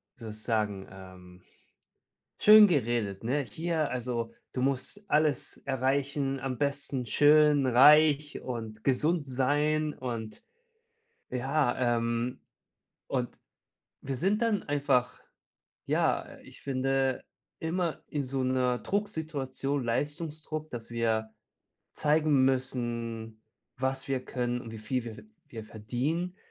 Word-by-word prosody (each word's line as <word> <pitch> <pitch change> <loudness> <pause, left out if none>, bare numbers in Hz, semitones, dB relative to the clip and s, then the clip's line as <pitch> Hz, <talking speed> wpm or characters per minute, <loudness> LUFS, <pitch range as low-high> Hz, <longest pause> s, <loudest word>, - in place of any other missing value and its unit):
wie 130 - -27
soll 110 - -6
ich 110 0 -7
sagen- 105 -4 -1
ähm, 90 -1 -13 1.0
schön 215 0 +9
geredet, 120 - 0
ne? 140 +5 +1
Hier, 160 +6 -2
also 120 -2 -3 0.2
du 125 - -2
musst 140 +10 -2
alles 150 -1 +1
erreichen, 135 +1 -1
am 130 -1 -3
besten 140 -2 -1
schön, 150 +1 +5
reich 145 +3 +5
und 110 -4 -6
gesund 145 +3 +1
sein 150 +4 +1
und 115 -4 -6 0.9
ja. 125 -2 +1
Ähm, 115 +1 -2 0.7
und 125 -2 -1 0.7
wir 135 -1 -3
sind 205 - +1
dann 220 -4 +1
einfach, 135 -4 +1 0.7
ja, - - +1
äh, - - -14
ich - - -15
finde 135 -1 0 0.4
immer 170 0 -2
in 145 -2 -2
so 130 +1 -2
'ner 125 -1 +1
Drucksituation 150 - -2
Leistungsdruck, 155 +4 -3
dass 115 -2 -7
wir 110 -1 0 0.6
zeigen 150 -3 +3
müssen, 115 -4 -2 0.3
was 135 +1 -2
wir 130 -1 -1
können 125 -1 -2
und 115 - -9
wie 110 - -7
viel 120 +3 -2
wir 110 -2 -7
ve - - -12 0.2
wir 110 -2 -8
verdienen 135 - -3
130 Hz, 120 wpm, -29 LUFS, 120-150 Hz, 1.0 s, schön